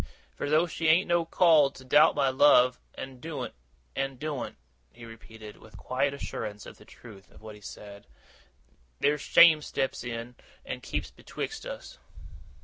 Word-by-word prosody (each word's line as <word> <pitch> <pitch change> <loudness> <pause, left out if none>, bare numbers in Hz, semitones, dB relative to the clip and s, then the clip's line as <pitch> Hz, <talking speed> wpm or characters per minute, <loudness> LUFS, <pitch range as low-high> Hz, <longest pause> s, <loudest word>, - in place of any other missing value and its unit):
For 145 - -5
though 155 +3 +4
she 165 -1 -3
ain't 165 +4 +4
no 170 -1 +1
call 160 -4 +4
to 130 -1 -15
doubt 150 +5 +5
my 135 - +2
love, 130 -2 +4 0.2
and 130 -1 -9
doen't 145 -7 -6 0.4
and 135 -1 -3
doen't,' 150 -3 -5 0.3
he 120 - -13
repeated, 110 -1 -12
with 110 - -16
a - - -11
quiet 135 +2 -1
assurance 105 -6 -6
of - - -12
the - - -16
truth 105 -5 -15
of - - -19
what 110 -1 -9
he 105 - -15
said, 100 -4 -11 0.9
'there's 145 0 +1
shame 160 -3 +6
steps 135 -4 -3
in, 120 0 -6 0.3
and - - -6
keeps - - -4
betwixt 440 +3 -7
us. - - -9
135 Hz, 165 wpm, -28 LUFS, 115-155 Hz, 0.9 s, shame